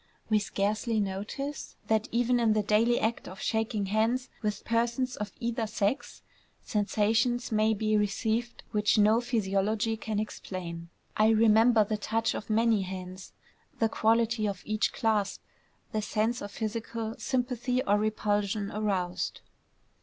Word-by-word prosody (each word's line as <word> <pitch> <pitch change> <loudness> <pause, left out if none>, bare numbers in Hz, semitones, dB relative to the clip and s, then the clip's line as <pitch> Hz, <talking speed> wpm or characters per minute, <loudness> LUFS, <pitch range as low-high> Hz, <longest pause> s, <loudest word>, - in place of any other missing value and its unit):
We 215 - +5
scarcely 210 +3 -1
notice 210 +9 -4
that 220 0 +1
even 245 +1 +2
in 225 -2 +3
the 215 -1 +1
daily 225 +4 +3
act 225 +1 -1
of 190 - -9
shaking 220 -2 -1
hands 225 +6 0
with 210 -2 -3
persons 235 +2 0
of 210 -1 -4
either 230 -1 -1
sex, 215 +4 -2 0.4
sensations 225 +4 +1
may 215 0 +3
be 215 +1 +1
received 220 +3 -1
which 210 0 +2
no 215 +2 +5
physiology 220 -1 0
can 220 -1 -3
explain. 175 -5 -6 0.3
I 215 - +4
remember 225 +1 +5
the 215 +1 -2
touch 225 +2 0
of - - -6
many 220 -1 +3
hands, 185 0 -7 0.4
the 225 - +2
quality 225 0 +2
of 195 -3 -4
each 215 0 0
clasp, 215 -3 0 0.5
the 215 - -1
sense 220 +3 0
of 205 - -5
physical 225 +1 -4
sympathy 250 0 -1
or 205 +1 +2
repulsion 210 -1 0
aroused. 195 -4 -2
215 Hz, 140 wpm, -29 LUFS, 205-230 Hz, 0.5 s, We